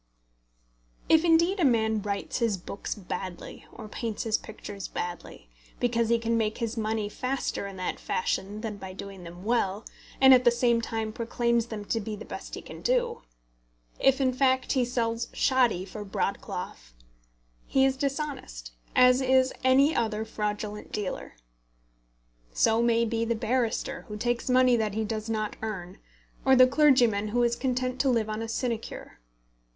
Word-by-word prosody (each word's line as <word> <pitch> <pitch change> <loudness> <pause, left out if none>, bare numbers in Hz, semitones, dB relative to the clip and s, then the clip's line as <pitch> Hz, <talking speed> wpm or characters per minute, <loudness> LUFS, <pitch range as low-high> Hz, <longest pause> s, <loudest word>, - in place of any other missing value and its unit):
If 320 0 +6
indeed 340 +3 +3
a - - +2
man 220 -5 +2
writes 200 +3 -3
his 230 -5 +1
books 190 +3 -6
badly, 185 -2 -7
or - - -9
paints 220 0 -4
his 220 -2 +1
pictures 205 -3 -6
badly, 175 - -6 0.3
because 235 -2 +1
he 235 - +4
can 230 0 0
make 215 -1 -1
his 230 -1 -3
money 220 -1 -1
faster 255 -2 -3
in 195 - -8
that 185 -1 -3
fashion 215 - -2
than 220 -3 -4
by 190 -2 -8
doing 195 -1 -9
them 175 +1 -10
well, 210 -2 0 0.3
and 265 0 +8
at 255 -1 +6
the 240 - +7
same 235 -1 +2
time 225 -1 -3
proclaims 235 0 0
them 215 -3 -6
to 225 - -1
be 215 0 -5
the - - -9
best - - -7
he - - -8
can - - -10
do, - - 0 0.8
if 270 0 +4
in 260 -2 +2
fact 260 0 +2
he 260 -3 +2
sells 235 -1 -1
shoddy 245 -9 +2
for 210 +2 -7
broadcloth, - - -4 0.7
he 265 0 +3
is 265 0 +2
dishonest, 275 - -4 0.2
as 250 +1 +6
is 260 0 +3
any 270 +4 +4
other 220 -1 0
fraudulent 210 -1 -4
dealer. 205 -3 -4 1.2
So 225 - +3
may 235 0 +3
be 230 0 -1
the 230 0 0
barrister 235 0 -1
who 210 - -6
takes 240 +3 -1
money 255 -1 +5
that 215 -2 -1
he 220 - 0
does 215 0 -4
not 215 -1 -2
earn, 195 -4 -5 0.4
or 265 0 +5
the 255 0 +8
clergyman 255 -7 +4
who 240 +3 +1
is 235 0 +2
content 255 0 -1
to 275 - +2
live 225 -3 +1
on 215 +1 -3
a 225 - -3
sinecure. 230 - -4
230 Hz, 165 wpm, -27 LUFS, 210-255 Hz, 1.2 s, and